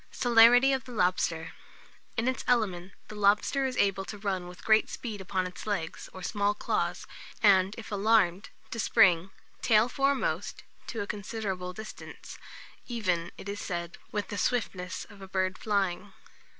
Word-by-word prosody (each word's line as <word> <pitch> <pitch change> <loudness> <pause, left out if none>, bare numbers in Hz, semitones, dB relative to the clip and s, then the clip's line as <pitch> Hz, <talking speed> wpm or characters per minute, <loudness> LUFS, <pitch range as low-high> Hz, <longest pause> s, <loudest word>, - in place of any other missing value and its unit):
CELERITY 245 +2 +6
OF 260 -3 -2
THE 250 - -9
LOBSTER. 180 -5 0 0.7
In 225 +2 0
its 255 - -1
element, 195 -7 0
the - - -9
lobster 210 +6 +2
is 255 - -5
able 195 -1 +2
to 210 - -7
run 195 -3 -2
with 180 0 -12
great 220 0 +4
speed 215 -5 -6
upon 185 0 -1
its 180 +3 -8
legs, 180 -6 -3
or 185 - -10
small 205 0 0
claws, - - -2 0.4
and, 195 -1 +5
if 230 -1 -9
alarmed, 200 -3 +2 0.2
to 230 - -4
spring, 180 -4 +4 0.3
tail 220 0 +4
foremost, 275 +2 -1 0.2
to 230 - -4
a - - -2
considerable 200 -3 -4
distance, 215 +4 -10 0.5
"even," 180 -8 -1
it - - -9
is 200 0 -4
said, 170 -2 -5
"with 210 -1 -3
the 205 - -4
swiftness 185 -7 -2
of 205 -2 -15
a 195 - -8
bird 185 -1 -1
flying." 200 -2 -1
205 Hz, 160 wpm, -29 LUFS, 185-225 Hz, 0.7 s, CELERITY